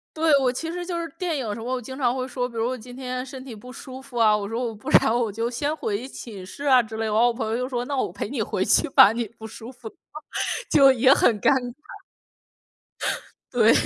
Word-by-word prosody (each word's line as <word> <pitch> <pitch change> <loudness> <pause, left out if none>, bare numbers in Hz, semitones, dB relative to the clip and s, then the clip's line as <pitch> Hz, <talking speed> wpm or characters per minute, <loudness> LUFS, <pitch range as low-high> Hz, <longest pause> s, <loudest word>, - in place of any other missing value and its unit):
对， 315 0 +2
我 250 -2 +2
其 325 +5 -4
实 355 +1 -4
就 345 -1 -3
是 330 - -5
电 355 -4 -1
影 260 - -3
有 205 - -2
时 - - -7
候 225 - -7
我 255 0 -1
经 260 +3 -8
常 250 -3 +1
会 255 0 -3
说， 250 -1 -2
比 240 - -11
如 225 - 0
我 255 - -2
今 245 +2 -11
天 255 0 -4
身 265 0 -9
体 255 -4 -9
不 250 +4 -11
舒 260 0 -9
服 265 -3 -8
啊， 215 -2 +5
我 200 -1 -3
说： 230 +3 -2
“我 225 - -6
不 205 - -7
然 225 - +5
我 230 -4 0
就 230 +3 -2
先 290 +5 -1
回 220 -4 -3
寝 215 -8 -9
室 280 +10 -9
啊。” 260 -3 +6
之 220 0 -8
类。 225 - -1
然 210 - -1
后 235 +2 +5
我 - - +1
朋 230 -2 -3
友 225 - 0
就 250 - -1
说： 245 -2 -2
“那 280 - -2
我 - - -1
陪 - - -4
你 - - -2
回 - - -2
去 - - +3
吧， 205 - +8
你 235 -1 -2
不 220 - -8
舒 225 +2 -10
服。” 240 -3 -10 0.8
就 275 -2 +7
也 260 +1 +4
很 220 -6 +3
尴 - - +4
尬， 245 -1 -5 1.8
对。 - - +5
245 Hz, 280 characters per minute, -24 LUFS, 225-265 Hz, 1.8 s, 吧